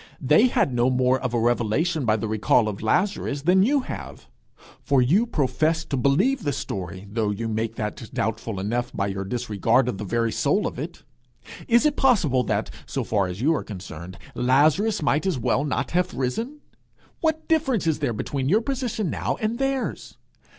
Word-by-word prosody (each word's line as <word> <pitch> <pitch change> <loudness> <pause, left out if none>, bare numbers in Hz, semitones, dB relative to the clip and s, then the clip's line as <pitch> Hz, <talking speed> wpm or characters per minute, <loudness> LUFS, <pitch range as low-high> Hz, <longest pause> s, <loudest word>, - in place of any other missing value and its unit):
They 150 - +5
had 140 - +1
no 120 +1 +2
more 130 0 +2
of 125 - -3
a 120 - 0
revelation 120 +7 +1
by 110 -1 +3
the 110 0 -3
recall 110 +2 +2
of 105 -2 -4
Lazarus 145 - 0
than 180 +3 +4
you 275 +7 +3
have. 250 - -8 0.6
For 140 -1 +2
you 175 - +3
profess 160 - 0
to 140 - -3
believe 140 - +2
the 145 - -1
story, 95 -3 -5
though 105 +1 -1
you 105 +3 -3
make 110 +1 -2
that 110 +1 -5
doubtful 110 -3 -2
enough 120 +5 -2
by 100 - -1
your 95 -1 -3
disregard 115 +3 +1
of 105 -6 -3
the - - -4
very 115 +3 0
soul 150 - +1
of - - -4
it. - - -7 0.6
Is 235 +4 +4
it 300 -1 +2
possible 180 - +3
that, - - -1 0.2
so - - -2
far 100 -4 0
as 90 +4 -6
you 155 +5 +3
are 155 - -2
concerned, 90 -3 -9 0.2
Lazarus 155 - +2
might 150 +5 +1
as 180 -7 0
well 130 +3 +1
not 145 - -2
have 180 +1 0
risen? 230 - -3 0.6
What 315 -1 -1
difference 270 - +1
is 160 -2 +1
there 145 -5 0
between 135 +4 -2
your 210 +6 +4
position 240 - -2
now - - -2
and 220 +3 -2
theirs? 270 -1 -2
130 Hz, 185 wpm, -24 LUFS, -, 0.6 s, They